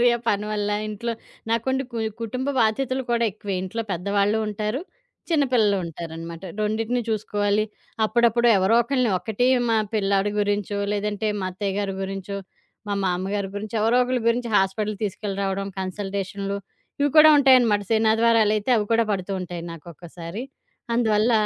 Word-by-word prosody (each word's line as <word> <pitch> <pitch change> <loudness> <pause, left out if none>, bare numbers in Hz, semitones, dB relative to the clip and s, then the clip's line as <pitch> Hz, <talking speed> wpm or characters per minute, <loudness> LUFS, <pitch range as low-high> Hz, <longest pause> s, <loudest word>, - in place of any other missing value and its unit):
మరి. 245 - +5
ఆ - - -8
పని 205 +1 +1
వల్ల 205 -1 -1 0.2
ఇంట్లో 230 +3 -3 0.4
నాకుండి 260 +4 0
కు 230 - -3 0.2
కుటుంబ 255 +4 -3
బాధ్యతలు 255 +4 +1
కూడా 235 0 +2
ఎక్కువే. 200 0 -5
ఇంట్లో 225 +5 -3
పెద్దవాళ్లు 200 +4 +1
ఉంటారు, 210 +5 -2 0.5
చిన్న 300 -3 +3
పిల్లలు 215 -5 +4
ఉంటారనమాట. 165 +1 -7 0.2
రొండిటినీ 220 +3 0
చూసుకోవాలి. 205 -1 0 0.4
అప్పుడప్పుడు 235 +1 +3
ఎవరో 190 +5 +3
ఒకళ్లని, 250 -2 +1
ఒకటి 220 +4 -1 0.2
మా 225 - +3 0.2
పిల్లాడు 200 -1 +1
గురించో, 205 0 -1
లేదంటే 210 +1 -1
మా 185 - -2
అత్తయ్యగారి 195 +1 -2
గురించో, 195 +1 -4 0.5
మా 205 - 0
మామగారి 190 +2 -1
గురించో 215 +2 -6
ఎవరో 225 +3 +3
ఒకళ్ల 255 0 -1
గురించి 235 0 0
హాస్పిటల్ 205 +2 0
తీసుకెళ్లి 200 0 -4
రావడం, 195 0 -1
కన్సల్టేషన్లు 195 +1 -3 0.4
ఇవి 290 - +3
కూడా 310 0 +10
ఉంటాయనమాట. 250 -7 +5
శననాదివారాలైతే, 220 0 +3
అవి 210 - +1
కూడా 230 0 +4
పడుతూ 195 0 -3
ఉంటాయి 175 -1 -6
నాకు 165 -1 -12
ఒక్కోసారి. 170 +6 -8 0.5
అందువల్ల 225 -1 +2
210 Hz, 145 wpm, -24 LUFS, 195-230 Hz, 0.5 s, కూడా